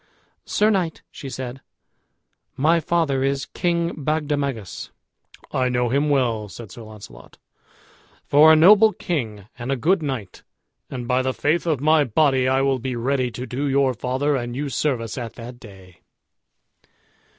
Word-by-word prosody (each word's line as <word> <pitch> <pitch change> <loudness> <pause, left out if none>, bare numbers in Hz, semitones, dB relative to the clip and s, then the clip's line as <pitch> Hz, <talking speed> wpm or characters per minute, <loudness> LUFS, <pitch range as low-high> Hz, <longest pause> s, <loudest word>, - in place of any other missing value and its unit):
"Sir 210 +1 +2
knight," 180 -6 -1
she 140 -3 -8
said, 130 0 -6 1.0
"my 160 +5 +3
father 155 -5 0
is 135 0 0
King 170 -1 -1
Bagdemagus." 145 -8 -2 0.6
"I 130 -1 +1
know 125 -1 0
him 140 +4 +1
well," 115 -7 0
said 110 -1 -10
Sir 120 - -10
Launcelot, 105 - -13 0.9
"for 150 +2 +6
a - - +7
noble 210 +7 +7
king 110 - -4
and 120 +3 -3
a - - +2
good 165 +8 +2
knight; 130 -10 -5 0.5
and, 125 -3 -6
by 125 +1 +2
the 130 0 -2
faith 160 +4 0
of 150 -6 0
my 155 0 +4
body, 135 0 +2
I 130 +1 +2
will 135 -1 +1
be 130 0 -4
ready 130 +1 0
to 120 +2 -6
do 135 +3 -3
your 135 -1 +2
father 130 +5 -1
and 120 -2 -3
you 145 +2 -3
service 120 -4 -2
at 115 -2 -6
that 120 +1 -9
day." 95 -6 -15
135 Hz, 155 wpm, -22 LUFS, 120-150 Hz, 1.0 s, a